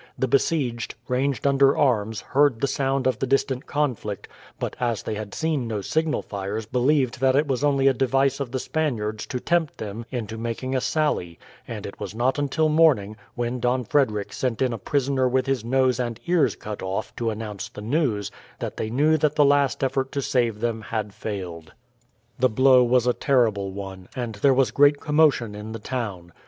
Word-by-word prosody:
The 130 - 0
besieged, 130 -4 0
ranged 130 -1 -1
under 140 0 +4
arms, 110 -6 +1
heard 140 -4 +2
the - - +1
sound 135 0 0
of 130 -3 +1
the 135 - -1
distant 135 -1 0
conflict, 125 -9 -2 0.3
but - - -3
as 120 -4 -1
they - - -3
had 105 -1 -6
seen 155 -6 -1
no 110 -3 -3
signal 160 +8 0
fires 100 +2 -4
believed 125 +2 +1
that 130 0 +3
it 145 +2 +3
was 135 -1 -1
only 140 -2 +3
a 135 - +5
device 135 +2 +1
of 135 -4 -4
the 130 - -1
Spaniards 115 -8 -2
to 125 - -3
tempt 165 +1 0
them 110 +2 -6
into 110 -3 -5
making 120 +3 -3
a 130 - +1
sally, 105 - -1 0.3
and - - -6
it - - -8
was - - -6
not 125 +5 +1
until 145 +2 +1
morning, 150 -10 +3 0.2
when 120 +1 -2
Don 125 +1 +1
Frederick 105 -6 0
sent 125 -4 -2
in 130 -2 +1
a 115 - -5
prisoner 135 +2 +1
with 130 +1 +1
his 135 -4 -1
nose 130 +1 +2
and 120 -2 -3
ears 175 -3 +2
cut 105 -1 -7
off 95 +1 -4
to 115 -1 0
announce 105 -1 -5
the 110 - -10
news, 110 - 0 0.3
that - - -5
they 110 - -2
knew 150 +7 +3
that 150 0 +1
the 145 - +5
last 140 -1 +2
effort 135 0 0
to 140 - -1
save 115 -5 0
them 115 -1 -1
had 110 -2 -4
failed. 90 -8 -6 0.7
The 130 +1 +4
blow 130 +2 +5
was 125 0 +3
a 125 - +3
terrible 110 -9 +1
one, 95 -1 -8
and 120 -3 -3
there 110 +7 +3
was 135 -1 +3
great 145 0 +4
commotion 150 -7 +2
in 105 +2 -7
the - - -4
town. 105 -8 -5
125 Hz, 195 wpm, -24 LUFS, 110-140 Hz, 0.7 s, a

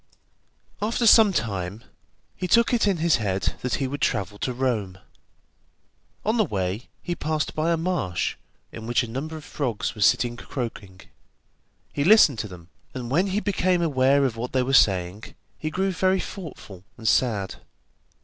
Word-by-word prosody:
After 230 +3 0
some 220 -2 +7
time 100 - -3 0.5
he 180 - -3
took 235 +7 +4
it 230 -3 +2
in 195 -3 +2
his 165 -2 +3
head 100 -4 -1
that 125 - -1
he 135 - -1
would 145 +2 -5
travel 100 -3 -1
to 130 - -1
Rome. 120 -7 -2 1.3
On 220 +3 +1
the 220 - +4
way 100 - -3
he 175 - -2
passed 155 -2 -2
by 155 +2 0
a 165 - +2
marsh, 165 - -1 0.4
in 110 -1 -8
which 120 +2 +2
a - - -5
number 145 +7 -5
of 155 - -10
frogs 125 -8 -3
were 105 - -9
sitting 120 +4 +3
croaking. 105 -8 -6 0.9
He 140 - 0
listened 160 - +6
to 105 - -3
them, 90 -3 -13 0.3
and 125 -1 -5
when 180 +8 +2
he 195 +2 0
became 185 -4 +1
aware 140 -2 +3
of 125 -4 -1
what 125 +2 -5
they 130 -1 +2
were 135 +2 -2
saying, 95 -3 +2 0.2
he 155 - -2
grew 190 +4 0
very 185 +1 +1
thoughtful 140 - -8
and 115 -2 -5
sad. 105 -6 +1
130 Hz, 170 wpm, -24 LUFS, 105-175 Hz, 1.3 s, some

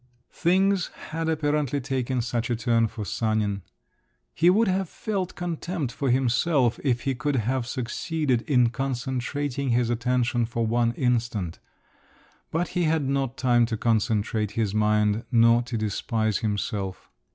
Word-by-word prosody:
Things 190 +1 +2 0.2
had 160 0 -2
apparently 145 -3 0
taken 130 -2 -1
such 120 0 -2
a 120 - +1
turn 115 0 +2
for 105 -1 -6
Sanin…. 105 -2 -1 0.7
He 170 +3 +4
would 215 +5 +4
have 190 -1 0
felt 195 -4 -3
contempt 170 -4 -3
for 135 0 -1
himself, 125 +1 +2
if 125 -4 +1
he 135 - 0
could 145 +2 -1
have 125 +1 0
succeeded 130 +1 -1
in 125 -4 +4
concentrating 135 +1 -2
his 120 0 +2
attention 120 -1 +1
for 115 0 -1
one 115 +1 +1
instant; 115 -9 -1 0.9
but 170 +2 -1
he 175 -1 0
had 155 -3 +1
not 135 -2 -1
time 120 -2 +3
to 115 -1 -2
concentrate 110 -1 0
his 105 -3 0
mind 105 +1 +2
nor 115 0 +5
to 120 -1 -4
despise 110 0 -1
himself. 100 -2 -3
125 Hz, 140 wpm, -25 LUFS, 115-145 Hz, 0.9 s, nor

